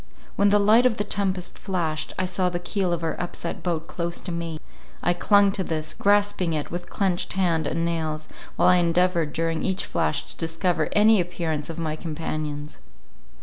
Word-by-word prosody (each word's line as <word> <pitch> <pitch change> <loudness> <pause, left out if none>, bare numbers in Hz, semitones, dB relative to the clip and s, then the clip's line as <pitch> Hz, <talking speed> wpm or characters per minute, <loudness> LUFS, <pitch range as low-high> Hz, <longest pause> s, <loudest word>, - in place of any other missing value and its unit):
When 200 0 +4
the 205 - +5
light 215 +5 +5
of 225 - -1
the 205 - 0
tempest 190 -3 -2
flashed, 160 -5 -2
I 185 - 0
saw 185 0 0
the 175 - -2
keel 180 +1 -1
of 170 -1 -2
our 160 - 0
upset 175 - -4
boat 165 -3 -2
close 170 0 -3
to 180 - -5
me—I 170 +1 -4
clung 200 +2 +4
to 195 - -2
this, 155 -2 -3
grasping 200 -4 +2
it 150 -2 -3
with 175 +1 -5
clenched 190 -4 -1
hand 175 -4 +1
and 165 - -1
nails, 160 -2 -2 0.3
while - - +4
I 180 - +6
endeavoured 170 -2 +2
during 165 +1 -1
each 190 0 0
flash 75 0 0
to 75 - -10
discover 165 0 0
any 210 -1 +6
appearance 165 -4 -3
of 165 - -6
my 160 -2 -2
companions. 155 -2 -5
175 Hz, 185 wpm, -25 LUFS, 160-190 Hz, 0.3 s, I